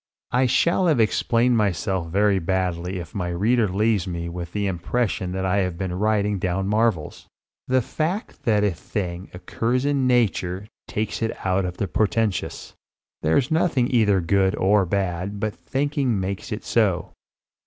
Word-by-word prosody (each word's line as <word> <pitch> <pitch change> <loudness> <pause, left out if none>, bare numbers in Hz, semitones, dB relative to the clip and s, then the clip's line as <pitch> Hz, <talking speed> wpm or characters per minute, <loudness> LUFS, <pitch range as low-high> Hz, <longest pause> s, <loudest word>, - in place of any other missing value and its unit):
I 125 +1 +3
shall 170 +8 +2
have 155 -7 +3
explained 115 +2 +2
myself 95 -3 0
very 100 +2 +2
badly 90 0 -1
if 85 -3 -8
my 90 -3 -2
reader 105 +6 +2
leaves 100 0 +1
me 85 -1 -4
with 85 0 -6
the 105 +1 -1
impression 95 +1 -1
that 95 0 -2
I 95 +1 +1
have 90 -3 0
been 95 -1 -3
writing 105 +1 +1
down 95 +1 -1
marvels. 105 -6 0 0.4
The 130 -1 +2
fact 170 - -3
that 105 -3 +3
a 105 - +3
thing 90 +1 -5
occurs 115 +8 -2
in 140 -2 +1
nature 100 -6 +1 0.2
takes 105 +1 -3
it 115 -3 -3
out 95 0 +1
of 90 0 -5
the 100 - -1
portentous. 110 -1 -1 0.5
There's 120 - +2
nothing 155 -7 +2
either 105 -5 +4
good 95 +3 +2
or 100 0 +3
bad 95 +1 -2
but 110 0 -1
thinking 135 -5 -1
makes 95 +1 -4
it - - -4
so. - - +1
100 Hz, 160 wpm, -23 LUFS, 90-115 Hz, 0.5 s, either